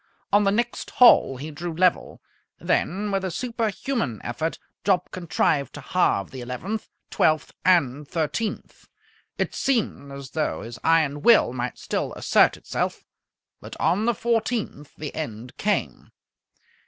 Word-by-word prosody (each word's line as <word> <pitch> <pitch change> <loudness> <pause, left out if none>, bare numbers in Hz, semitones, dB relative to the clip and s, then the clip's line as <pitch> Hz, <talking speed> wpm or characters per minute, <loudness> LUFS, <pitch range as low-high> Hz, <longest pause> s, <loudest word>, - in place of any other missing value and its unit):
On 205 0 +5
the 195 - +4
next 240 +3 -1
hole 240 - +6
he 150 +4 -6
drew 165 +2 -5
level. 180 +1 +1 0.3
Then 205 +4 0
with 195 -1 0
a 190 - -1
superhuman 230 - -2
effort 140 +8 -3 0.3
Jopp 185 -2 +1
contrived 155 -6 0
to - - -7
halve 100 - +1
the 130 - -7
eleventh, 155 - -5 0.2
twelfth, 155 -1 +2
and 150 -6 +2
thirteenth. 170 +8 -3 0.5
It - - -1
seemed 210 - -1
as 140 -1 -9
though 155 -1 -2
his 115 0 -8
iron 155 -3 +2
will 220 - +5
might 125 0 -3
still - - -3
assert - - +3
itself, - - -3 0.6
but - - -10
on 205 +5 +2
the 240 -1 +2
fourteenth 225 - -2
the 150 -2 -6
end 120 -5 -6
came. 210 0 -1
165 Hz, 140 wpm, -24 LUFS, 140-210 Hz, 0.6 s, hole